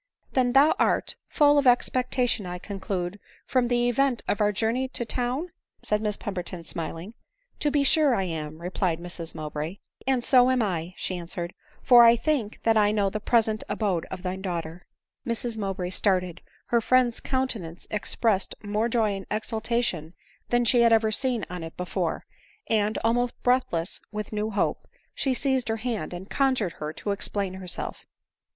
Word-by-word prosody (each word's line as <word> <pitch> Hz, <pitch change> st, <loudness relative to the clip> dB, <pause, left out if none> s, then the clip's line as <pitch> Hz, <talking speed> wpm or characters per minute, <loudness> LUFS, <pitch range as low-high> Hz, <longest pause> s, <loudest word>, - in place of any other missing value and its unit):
" -, -, -43 dB
Then 250 Hz, -2 st, +2 dB
thou 285 Hz, +4 st, +6 dB
art -, -, +1 dB
full 290 Hz, -1 st, +5 dB
of 280 Hz, -, +1 dB
expectation, 245 Hz, -3 st, +2 dB
I 180 Hz, 0 st, -4 dB
conclude, 195 Hz, -1 st, -4 dB, 0.3 s
from 255 Hz, -2 st, +2 dB
the 240 Hz, 0 st, +2 dB
event 245 Hz, 0 st, +1 dB
of 205 Hz, -, 0 dB
our 210 Hz, 0 st, +4 dB
journey 225 Hz, +5 st, 0 dB
to 245 Hz, -2 st, -3 dB
town 255 Hz, +9 st, -2 dB
?" -, -, -46 dB
said 210 Hz, 0 st, +1 dB
Miss 210 Hz, -1 st, 0 dB
Pemberton 180 Hz, -3 st, -5 dB
smiling. 165 Hz, +5 st, -5 dB, 0.2 s
" -, -, -42 dB
To 295 Hz, -, +1 dB
be 290 Hz, 0 st, +2 dB
sure 285 Hz, -2 st, +4 dB
I 195 Hz, -, 0 dB
am," 155 Hz, -3 st, -5 dB
replied 180 Hz, -1 st, -1 dB
Mrs 170 Hz, -1 st, -6 dB
Mowbray. 155 Hz, +4 st, -4 dB
" -, -, -26 dB
And 260 Hz, -2 st, +2 dB
so 250 Hz, -1 st, +5 dB
am 255 Hz, -2 st, +2 dB
I," 180 Hz, -2 st, -3 dB
she 185 Hz, -, -3 dB
answered 170 Hz, 0 st, -5 dB
— -, -, -30 dB
" -, -, -32 dB
for 245 Hz, -2 st, +8 dB
I 230 Hz, 0 st, +8 dB
think 235 Hz, -4 st, -1 dB
that 225 Hz, -1 st, +4 dB
I 210 Hz, -1 st, +4 dB
know 205 Hz, -2 st, +1 dB
the 215 Hz, -, -2 dB
present 220 Hz, -1 st, +2 dB
abode 190 Hz, -6 st, -1 dB
of 190 Hz, -1 st, -7 dB
thy 185 Hz, 0 st, -2 dB
daughter." 175 Hz, -2 st, -5 dB, 0.4 s
Mrs 235 Hz, 0 st, -1 dB
Mowbray 190 Hz, -3 st, -3 dB
started 180 Hz, -3 st, 0 dB
— -, -, -34 dB
her 235 Hz, -1 st, +4 dB
friend's 250 Hz, 0 st, +3 dB
countenance 230 Hz, -11 st, -2 dB
ex 210 Hz, -1 st, -1 dB
pressed 210 Hz, -5 st, +1 dB
more 210 Hz, +3 st, 0 dB
joy 225 Hz, -3 st, +2 dB
and 195 Hz, -1 st, -8 dB
exultation 220 Hz, -6 st, -1 dB, 0.3 s
than 240 Hz, 0 st, +2 dB
she 240 Hz, +1 st, +5 dB
had 235 Hz, -1 st, +5 dB
ever 220 Hz, -1 st, +4 dB
seen 245 Hz, -1 st, 0 dB
on 180 Hz, -1 st, -6 dB
it 165 Hz, -, -9 dB
before; 180 Hz, 0 st, -2 dB, 0.4 s
and, 215 Hz, -1 st, +1 dB
almost 240 Hz, +2 st, +1 dB
breathless 245 Hz, -9 st, +1 dB
with 210 Hz, 0 st, -5 dB
new 210 Hz, +1 st, -1 dB
hope, 210 Hz, -, -1 dB, 0.3 s
she 265 Hz, -2 st, 0 dB
seized 265 Hz, -1 st, 0 dB
her 225 Hz, -, 0 dB
hand 230 Hz, -2 st, -3 dB
and 180 Hz, +2 st, -8 dB
conjured 260 Hz, -10 st, +1 dB
her 150 Hz, 0 st, -2 dB
to 205 Hz, -, -4 dB
explain 200 Hz, -1 st, -2 dB
herself. 185 Hz, -2 st, -6 dB
215 Hz, 185 wpm, -26 LUFS, 185-245 Hz, 0.4 s, for